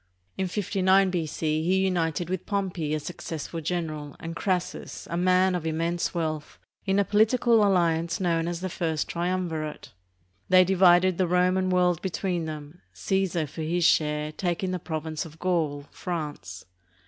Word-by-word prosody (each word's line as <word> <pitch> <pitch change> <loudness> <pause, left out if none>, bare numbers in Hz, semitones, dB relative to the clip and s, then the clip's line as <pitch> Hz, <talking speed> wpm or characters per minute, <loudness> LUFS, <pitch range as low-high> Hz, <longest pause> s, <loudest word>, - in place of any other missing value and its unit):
In 190 - -1
59 190 0 +2
B.C. 155 -2 -1
he 180 +3 +2
united 170 -2 0
with 185 0 -4
Pompey, 185 -7 -1
a - - -1
successful 165 0 -6
general, 155 -3 -3
and 165 0 -6
Crassus, 185 0 -3
a - - -1
man 185 +1 +3
of 180 -3 -2
immense 165 +2 -1
wealth, 155 -3 -3 0.3
in 195 +1 +2
a 200 - +3
political 225 +2 +4
alliance 170 -4 +2
known 170 -3 +1
as 175 0 -3
the 185 - -2
First 160 -3 -2
Triumvirate. 170 -3 -3 0.6
They 185 0 +7
divided 185 -1 +4
the 185 - +3
Roman 185 +1 +2
world 180 -2 +2
between 180 -2 -2
them, 155 +2 -8
Caesar, 190 -4 0
for 150 +3 -8
his 170 +2 0
share, 150 -1 +2
taking 175 +3 -2
the 180 - -2
province 160 -1 -4
of 160 -2 -12
Gaul 160 -6 -1
(France). 150 - -5
175 Hz, 150 wpm, -26 LUFS, 160-185 Hz, 0.6 s, They